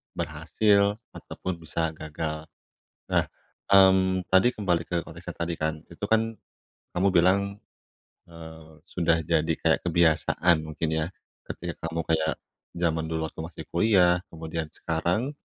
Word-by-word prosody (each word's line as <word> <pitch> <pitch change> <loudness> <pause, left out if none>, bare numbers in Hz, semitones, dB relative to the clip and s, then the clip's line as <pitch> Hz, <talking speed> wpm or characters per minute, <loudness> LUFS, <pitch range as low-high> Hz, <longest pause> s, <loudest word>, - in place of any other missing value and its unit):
berhasil 100 +6 +2 0.2
ataupun 90 -2 -6
bisa 80 0 -2
gagal. 80 0 -5 0.6
Nah, - - +2 0.5
mmm, 95 -1 +5
tadi 95 +7 +4
kembali 90 -5 0
ke 90 - -3
konteksnya 85 +2 -9
tadi 85 0 -2
kan, 80 0 -2
itu 85 +4 -5
kan, 110 0 +5 0.7
kamu 95 +3 +2
bilang, 95 +3 +5 0.9
eee, 80 -1 -11 0.2
sudah 85 -2 +1
jadi 80 0 +1
kayak - - +3
kebiasaan 85 0 +3
mungkin 80 +1 -3
ya. 80 - 0 0.4
Ketika - - -5
kamu 80 0 -2
kayak 80 -1 +2 0.4
jaman 80 -2 0
dulu 80 -1 -1
waktu - - -15
masih 85 - -9
kuliah, 90 -2 +4
kemudian 80 -1 -5
sekarang, 90 - -1
85 Hz, 130 wpm, -26 LUFS, 80-90 Hz, 0.9 s, mmm